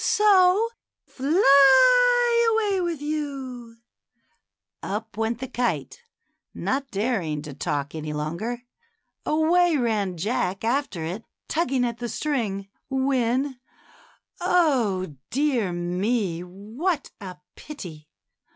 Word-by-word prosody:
So 405 Hz, 0 st, +4 dB, 0.4 s
fly 470 Hz, -, +5 dB
away 415 Hz, -4 st, +1 dB
with 335 Hz, -5 st, -3 dB
you! 270 Hz, -6 st, -5 dB, 0.6 s
" -, -, -51 dB
Up 215 Hz, +3 st, -5 dB
went 225 Hz, +1 st, -1 dB
the 260 Hz, +2 st, -6 dB
kite, 245 Hz, -, -2 dB, 0.5 s
not 270 Hz, +1 st, -2 dB
daring 195 Hz, -9 st, -2 dB
to 150 Hz, -2 st, -8 dB
talk 140 Hz, +1 st, -3 dB
any 155 Hz, -1 st, -5 dB
longer; 170 Hz, +12 st, -4 dB, 0.6 s
away 330 Hz, +2 st, +3 dB
ran 210 Hz, -7 st, -1 dB
Jack 200 Hz, 0 st, -2 dB
after 230 Hz, -, -1 dB
it, 185 Hz, +7 st, -5 dB, 0.2 s
tugging 270 Hz, -6 st, 0 dB
at 235 Hz, -1 st, -4 dB
the 240 Hz, -1 st, -4 dB
string, 220 Hz, -11 st, -2 dB, 0.2 s
when 265 Hz, 0 st, 0 dB, 0.4 s
— -, -, -31 dB
Oh, 240 Hz, -, +1 dB
dear 260 Hz, -8 st, 0 dB
me! 180 Hz, +1 st, -1 dB
what 220 Hz, -, -4 dB
a 185 Hz, -2 st, -8 dB, 0.2 s
pity 170 Hz, -, -10 dB
245 Hz, 105 wpm, -24 LUFS, 195-305 Hz, 0.6 s, fly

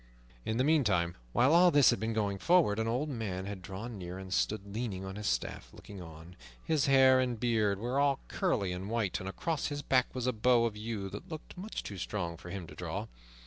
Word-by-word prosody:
In 110 Hz, -, -1 dB
the 130 Hz, -, +3 dB
meantime, 105 Hz, -, +2 dB, 0.2 s
while 130 Hz, -, +4 dB
all 175 Hz, +1 st, +7 dB
this 145 Hz, -5 st, +6 dB
had -, -, -1 dB
been 110 Hz, +2 st, -1 dB
going 100 Hz, -3 st, -1 dB
forward, 150 Hz, -, +3 dB
an 110 Hz, -, 0 dB
old 125 Hz, +6 st, 0 dB
man 105 Hz, -9 st, -4 dB
had 100 Hz, -1 st, -6 dB
drawn 105 Hz, +4 st, -7 dB
near 90 Hz, 0 st, -6 dB
and 95 Hz, -1 st, -6 dB
stood 105 Hz, 0 st, 0 dB
leaning 105 Hz, -5 st, -3 dB
on 95 Hz, 0 st, -6 dB
his 105 Hz, 0 st, -4 dB
staff, -, -, -2 dB
looking 100 Hz, -2 st, -11 dB
on. 80 Hz, +1 st, -11 dB, 0.3 s
His 155 Hz, -3 st, +1 dB
hair 130 Hz, -1 st, +6 dB
and 125 Hz, -3 st, 0 dB
beard 110 Hz, -4 st, +2 dB
were 120 Hz, +6 st, -1 dB
all 140 Hz, -1 st, +3 dB
curly 115 Hz, -, 0 dB
and 90 Hz, +3 st, -5 dB
white, 105 Hz, -5 st, 0 dB
and 95 Hz, -, -5 dB
across 160 Hz, +9 st, -2 dB
his 145 Hz, -1 st, -4 dB
back 130 Hz, -2 st, +3 dB
was 125 Hz, -2 st, -2 dB
a 125 Hz, -, +1 dB
bow 115 Hz, +1 st, +3 dB
of 115 Hz, -2 st, -2 dB
yew 105 Hz, -2 st, -4 dB
that -, -, -8 dB
looked 155 Hz, -1 st, -8 dB
much 195 Hz, +4 st, -5 dB
too 100 Hz, -2 st, -7 dB
strong 85 Hz, -4 st, -3 dB
for 90 Hz, +1 st, -11 dB
him 90 Hz, -1 st, -5 dB
to -, -, -12 dB
draw. -, -, -4 dB
110 Hz, 225 wpm, -31 LUFS, 95-130 Hz, 0.3 s, all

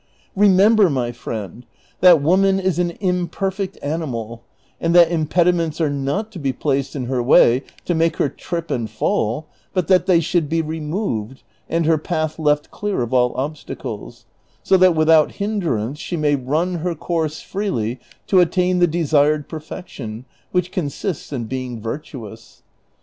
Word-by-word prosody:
Remember, 205 Hz, +1 st, +5 dB
my 125 Hz, -4 st, -1 dB
friend, 115 Hz, -2 st, -7 dB, 0.4 s
that 175 Hz, -5 st, +6 dB
woman 190 Hz, +4 st, +3 dB
is 185 Hz, -3 st, 0 dB
an 175 Hz, -1 st, -1 dB
imperfect 190 Hz, +1 st, -2 dB
animal, 120 Hz, -7 st, -4 dB, 0.4 s
and 170 Hz, +1 st, 0 dB
that 170 Hz, -1 st, +7 dB
impedi 170 Hz, +2 st, +2 dB
ments 165 Hz, -2 st, -2 dB
are 155 Hz, -3 st, +1 dB
not 145 Hz, +11 st, -2 dB
to 190 Hz, -, -8 dB
be 140 Hz, -3 st, 0 dB
placed 135 Hz, 0 st, -2 dB
in 130 Hz, -3 st, -3 dB
her 125 Hz, 0 st, -1 dB
way 120 Hz, 0 st, +5 dB, 0.2 s
to 175 Hz, -, 0 dB
make 165 Hz, 0 st, +1 dB
her -, -, +2 dB
trip 170 Hz, +3 st, -5 dB
and 115 Hz, -3 st, -2 dB
fall, 110 Hz, +5 st, -1 dB, 0.3 s
but 185 Hz, -2 st, 0 dB
that 185 Hz, -1 st, +4 dB
they 180 Hz, -3 st, +5 dB
should 170 Hz, -2 st, 0 dB
be 165 Hz, +1 st, +1 dB
removed, 150 Hz, -, -4 dB, 0.3 s
and 165 Hz, 0 st, 0 dB
her 160 Hz, -1 st, +3 dB
path 155 Hz, -1 st, -2 dB
left 150 Hz, -1 st, +1 dB
clear 205 Hz, -10 st, -2 dB
of 120 Hz, -, -5 dB
all 125 Hz, -1 st, +3 dB
obstacles, 145 Hz, +3 st, -6 dB, 0.4 s
so -, -, +4 dB
that 185 Hz, -2 st, +5 dB
without 155 Hz, -1 st, +4 dB
hinderance 160 Hz, -, -2 dB
she 175 Hz, -, -4 dB
may 150 Hz, -2 st, +2 dB
run 155 Hz, +7 st, -1 dB
her 175 Hz, +1 st, -2 dB
course 160 Hz, -1 st, -2 dB
freely 125 Hz, -, -3 dB, 0.3 s
to 190 Hz, -, +4 dB
attain 180 Hz, +1 st, +2 dB
the 175 Hz, -, +5 dB
desired 150 Hz, -3 st, +2 dB
perfection, 140 Hz, -7 st, -8 dB, 0.3 s
which 180 Hz, 0 st, 0 dB
consists 175 Hz, -1 st, -4 dB
in 130 Hz, -4 st, -3 dB
being 125 Hz, 0 st, -5 dB
virtuous. 115 Hz, -2 st, -8 dB
155 Hz, 160 wpm, -20 LUFS, 135-180 Hz, 0.4 s, that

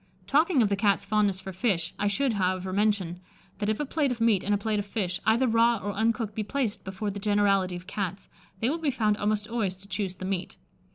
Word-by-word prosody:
Talking 290 Hz, -, +3 dB
of 205 Hz, -, +2 dB
the 200 Hz, -, +2 dB
Cat's 200 Hz, -1 st, +2 dB
fondness 205 Hz, -2 st, +1 dB
for 190 Hz, 0 st, -7 dB
fish, 180 Hz, -5 st, 0 dB
I 205 Hz, -, +1 dB
should, 260 Hz, +4 st, +1 dB
however, 185 Hz, -1 st, -1 dB
mention, 200 Hz, -4 st, +1 dB, 0.4 s
that 205 Hz, -, 0 dB
if 215 Hz, -, 0 dB
a 295 Hz, -, 0 dB
plate 285 Hz, -1 st, 0 dB
of 240 Hz, -, -3 dB
meat 225 Hz, -5 st, +3 dB
and 205 Hz, -, -1 dB
a 205 Hz, -, +4 dB
plate 210 Hz, +1 st, -1 dB
of 205 Hz, -, -3 dB
fish, 190 Hz, -3 st, -2 dB
either 230 Hz, +4 st, +4 dB
raw 230 Hz, +1 st, +4 dB
or 205 Hz, +3 st, +1 dB
cooked, 225 Hz, -3 st, -4 dB
be 220 Hz, -, -2 dB
placed 230 Hz, 0 st, -2 dB
before 195 Hz, +2 st, -3 dB
the 200 Hz, -, -6 dB
generality 200 Hz, -3 st, +2 dB
of 175 Hz, +1 st, -8 dB
Cats, 190 Hz, -1 st, -4 dB, 0.3 s
they 230 Hz, -, +2 dB
will 330 Hz, -, -2 dB
be 315 Hz, -3 st, 0 dB
found 215 Hz, -5 st, +1 dB
almost 210 Hz, 0 st, 0 dB
always 225 Hz, -5 st, -1 dB
to 190 Hz, +2 st, -17 dB
choose 190 Hz, -1 st, -3 dB
the 185 Hz, -, -7 dB
meat. 190 Hz, -1 st, -3 dB
205 Hz, 235 wpm, -27 LUFS, 190-225 Hz, 0.4 s, a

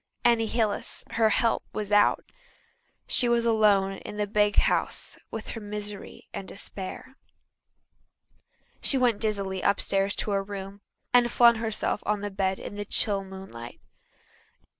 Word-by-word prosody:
Annie 230 Hz, -2 st, +4 dB
Hillis, 220 Hz, -2 st, -1 dB
her 225 Hz, -1 st, +3 dB
"help," 230 Hz, +2 st, +1 dB
was 210 Hz, -1 st, -4 dB
out. 205 Hz, 0 st, +4 dB, 0.8 s
She 245 Hz, -, +3 dB
was 235 Hz, -1 st, +2 dB
alone 205 Hz, -4 st, +3 dB
in 210 Hz, -, -8 dB
the 210 Hz, -, 0 dB
big 205 Hz, 0 st, +2 dB
house -, -, +1 dB
with 225 Hz, -, -6 dB
her 225 Hz, -, -6 dB
misery 210 Hz, -1 st, -6 dB
and 195 Hz, -, -6 dB
despair. 205 Hz, +7 st, -6 dB, 1.6 s
She 275 Hz, -, +2 dB
went 240 Hz, -5 st, +2 dB
dizzily 200 Hz, -4 st, -1 dB
upstairs 200 Hz, 0 st, +1 dB
to 210 Hz, -, -2 dB
her 200 Hz, -, +2 dB
own 195 Hz, -, -11 dB
room 200 Hz, 0 st, -7 dB, 0.3 s
and 245 Hz, -1 st, +5 dB
flung 235 Hz, -1 st, +6 dB
herself 220 Hz, -2 st, -1 dB
on 210 Hz, -1 st, 0 dB
the 205 Hz, 0 st, -4 dB
bed 190 Hz, -1 st, -1 dB
in 205 Hz, -, -7 dB
the 205 Hz, -, -4 dB
chill 200 Hz, -1 st, +1 dB
moonlight. 190 Hz, -12 st, -10 dB
205 Hz, 145 wpm, -27 LUFS, 195-225 Hz, 1.6 s, flung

